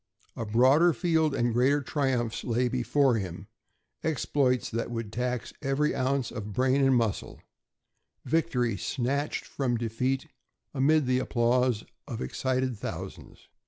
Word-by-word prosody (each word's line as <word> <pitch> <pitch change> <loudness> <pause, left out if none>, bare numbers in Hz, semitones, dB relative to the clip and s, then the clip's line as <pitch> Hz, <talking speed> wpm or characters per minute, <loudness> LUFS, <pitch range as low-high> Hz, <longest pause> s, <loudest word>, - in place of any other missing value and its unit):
A 115 - -4
broader 135 +10 +5
field 160 -3 +1
and 120 -2 +1
greater 130 +5 +3
triumphs 130 -5 -1
lay 120 +1 +1
before 130 +1 +2
him 95 0 -6 0.6
exploits 130 -3 +1
that 115 +1 -2
would 115 -3 -5
tax 125 0 -2
every 145 +2 +1
ounce 130 -1 0
of 105 -3 -6
brain 130 +5 +2
and 135 -1 +4
muscle; 115 -5 -1 0.9
victory 125 -9 +1
snatched 140 - -2
from 125 -4 -1
defeat 125 +5 -1 0.5
amid 145 +2 +3
the 125 0 +2
applause 125 -2 +1 0.2
of - - -5
excited 130 - -1
thousands. - - -7
125 Hz, 125 wpm, -28 LUFS, 120-140 Hz, 0.9 s, broader